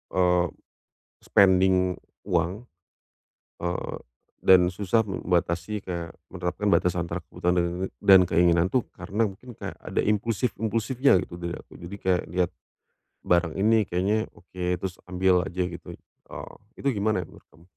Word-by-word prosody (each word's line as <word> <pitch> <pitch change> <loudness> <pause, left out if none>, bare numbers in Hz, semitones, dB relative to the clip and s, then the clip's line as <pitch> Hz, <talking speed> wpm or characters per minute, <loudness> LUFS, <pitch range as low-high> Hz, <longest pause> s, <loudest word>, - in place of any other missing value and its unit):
eee, 90 -1 +3 0.8
spending 95 -1 +5 0.5
uang, 90 +6 0 1.0
eee, 90 +1 -3 0.5
dan 90 -1 +7
susah 100 +4 +1
membatasi 90 +1 -1
kayak 85 -3 -5 0.2
menerapkan 95 +3 -3
batasan 85 -1 +2
antara 85 - -2
kebutuhan 90 +1 -1
dan 95 -1 +7
keinginan 85 0 +3
itu 125 +1 +1
karena 110 +3 -1
mungkin 120 +5 -12
kayak - - -7
ada - - -1
impulsif-impulsifnya, 110 +3 +1
gitu - - -12
dari 85 0 -3
aku. - - -15
Jadi 85 +3 -7
kayak 90 -1 +1
lihat 90 0 0 0.8
barang 85 -2 +2
ini 110 0 +3
kayaknya 100 +5 0
oke, 90 +1 -9 0.2
terus 95 -1 -5
ambil 90 0 +3
aja, 90 +1 -2
gitu. 85 - -9 0.3
Eee, - - -9 0.2
itu 140 - -3
gimana 105 -3 0
ya - - -12
menurut - - -17
kamu? 80 - -21
90 Hz, 135 wpm, -26 LUFS, 90-105 Hz, 1.0 s, dan